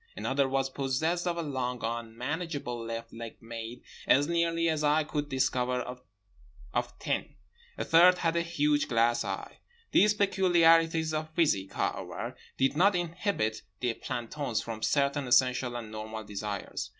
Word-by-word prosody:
Another 135 0 0
was 135 0 +1
possessed 155 +7 -1
of 170 -1 -1
a 170 - -1
long 125 -4 -3
unmanageable 120 +3 -3
left 115 0 -6
leg 115 -1 -7
made, 115 +1 -7 0.2
as 140 +2 +5
nearly 165 0 +1
as 155 -2 0
I 150 +1 +3
could 150 -1 -3
discover, 130 -2 +1 0.9
of - - -2
tin. - - -2 0.4
A - - -2
third 180 +2 +6
had 165 -1 0
a 170 - +2
huge 150 -3 +1
glass 120 0 +2
eye. - - -5 0.3
These 210 +2 +5
peculiarities 165 -5 +4
of 155 0 -2
physique, 100 - +1
however, - - -3 0.2
did 135 +2 +2
not 195 +5 +4
inhibit 170 - -1 0.2
the 120 -2 0
plantons 120 +1 -3
from 110 -1 -6
certain 140 +3 +1
essential 125 0 +3
and 115 -3 -6
normal 110 0 -6
desires. 105 0 -5
140 Hz, 145 wpm, -29 LUFS, 120-165 Hz, 0.9 s, third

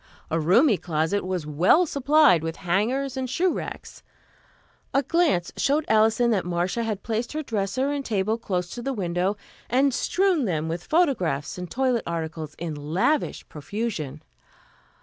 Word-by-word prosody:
A 165 - +1
roomy 195 - +4
closet 165 +4 -1
was 185 -3 -3
well 170 - +4
supplied 285 - +4
with 165 0 -4
hangers 245 +10 0
and 260 -1 -3
shoe 355 +7 +1
racks. - - -7 0.9
A 275 - +4
glance 310 - +1
showed 295 +2 +1
Alison 220 +2 +3
that 200 -5 +1
Marcia 180 +5 -1
had 220 -3 -3
placed 230 +3 -2
her 310 0 -3
dresser 230 +4 -1
and 285 -1 -2
table 215 -1 -1
close 180 -5 -3
to 240 - -6
the 270 +3 -2
window 185 -1 -1 0.3
and 265 +3 +3
strewn 360 0 +1
them 160 -5 -1
with 170 +2 -4
photographs 180 - 0
and 180 -1 -6
toilet 255 +1 +1
articles 160 -2 -4
in 170 -2 -4
lavish 160 - -1
profusion. 155 - -5
210 Hz, 150 wpm, -25 LUFS, 170-265 Hz, 0.9 s, roomy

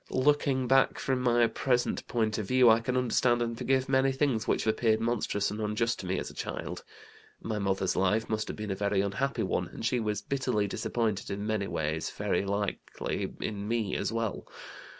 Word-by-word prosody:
Looking 135 -1 +2
back 135 +1 +4
from 130 -1 -1
my 120 -1 +4
present 125 +1 0
point 110 -2 0
of 105 - -4
view, 125 -1 +6
I 110 - +5
can 125 +2 -1
understand 120 -1 +2
and 115 0 -3
forgive 130 +2 +1
many 135 0 +3
things 135 -5 0
which - - +1
appeared 110 0 +2
monstrous 110 -3 0
and 105 +1 -4
unjust 110 +2 0
to 95 - -6
me 95 - 0
as - - -4
a - - -14
child. - - -5 0.6
My 110 -2 -3
mother's 95 -1 0
life 105 +4 +2
must 110 0 -1
have - - -5
been 105 -1 -4
a - - -1
very 100 0 +1
unhappy 130 +8 -1
one, - - -1
and - - -7
she 125 +1 +1
was 105 -2 -2
bitterly 125 -6 0
disappointed 110 0 -2
in 100 +1 -3
many 110 -2 -1
ways, 80 +1 -2
very - - -1
likely 100 0 -3
in 105 -1 -3
me 110 -3 0
as - - -1
well. 115 -3 -3
110 Hz, 195 wpm, -29 LUFS, 105-125 Hz, 0.6 s, view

